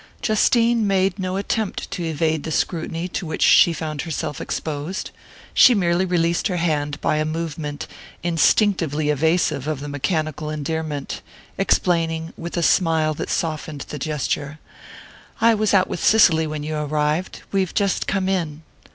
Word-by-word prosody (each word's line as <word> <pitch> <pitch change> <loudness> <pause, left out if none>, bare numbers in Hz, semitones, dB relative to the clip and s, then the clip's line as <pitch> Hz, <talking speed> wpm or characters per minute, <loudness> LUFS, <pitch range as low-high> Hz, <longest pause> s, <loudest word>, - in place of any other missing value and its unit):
Justine 230 0 +3
made 195 0 +1
no 185 0 -2
attempt 205 +1 -2
to 190 -3 -3
evade 160 -1 0
the 160 - -5
scrutiny 165 +1 -2
to 175 - -4
which 160 - -1
she 170 - +6
found 155 -2 -4
herself 160 -3 -4
exposed; 155 +4 -4 0.4
she 250 - +7
merely 175 -1 +2
released 170 0 +1
her 180 -4 -2
hand 150 -3 -1
by 155 - +1
a 155 - +1
movement 155 -2 -4 0.4
instinctively 165 -3 +2
evasive 160 -1 +1
of 155 -3 -2
the 145 - -6
mechanical 155 +1 -2
endearment, 155 -1 -4 0.3
explaining, 165 -2 0
with 170 +1 -6
a 170 - +1
smile 160 -3 +3
that - - -5
softened 155 -4 -2
the 150 - -5
gesture: 150 +1 -2 0.8
"I 230 0 +5
was 215 -1 +1
out 190 -2 +4
with - - -4
Cicely 165 -7 +5
when 150 -1 -4
you 155 0 -3
arrived. 150 +3 -1
We've 190 -2 0
just 200 -2 0
come 195 -2 0
in." 165 -5 -2
160 Hz, 150 wpm, -22 LUFS, 150-185 Hz, 0.8 s, she